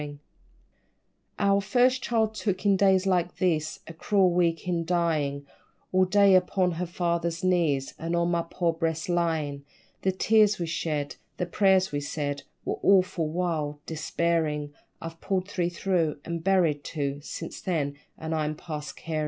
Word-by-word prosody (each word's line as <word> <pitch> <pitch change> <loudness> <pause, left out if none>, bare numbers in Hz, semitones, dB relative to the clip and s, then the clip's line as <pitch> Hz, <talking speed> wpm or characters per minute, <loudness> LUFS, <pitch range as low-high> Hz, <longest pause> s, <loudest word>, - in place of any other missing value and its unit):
_ 145 -1 -7 1.2
Our 200 0 +3
first 250 +6 +2
child 220 -3 +1
took, 200 -3 -2
in 200 -1 +5
days 190 -1 +3
like 180 -2 +1
these, 155 -4 0
A 165 - -9
cruel 190 +2 +2
week 170 -1 +1
in 170 -2 0
dyin', 160 -5 0 0.5
All 185 0 +4
day 200 +1 +5
upon 185 0 +3
her 175 +2 -3
father's 170 -1 -1
knees, 165 -7 +1
Or 165 +1 -2
on 170 0 +1
my 170 -1 +1
poor 170 -2 0
breast 165 0 -2
lyin'; 160 -5 0 0.4
The 190 - +2
tears 210 +2 +3
we 170 - -2
shed 155 -3 -3 0.2
the 180 - -1
prayers 190 +1 +3
we 145 - -1
said 145 -1 -3 0.2
Were - - -2
awful, 185 -4 +3
wild 155 -4 -2
despairin'! 160 -2 -1 0.3
I've 165 0 -8
pulled 190 -1 -1
three 175 -3 -1
through, 170 -3 0
and 170 -1 -4
buried 170 -6 +2
two 140 -2 -3
Since 165 +2 -7
then 150 -6 -1 0.2
and 160 0 -4
I'm 155 -1 -1
past 150 -2 -7
carin'. 160 -2 -3
170 Hz, 160 wpm, -27 LUFS, 155-185 Hz, 1.2 s, in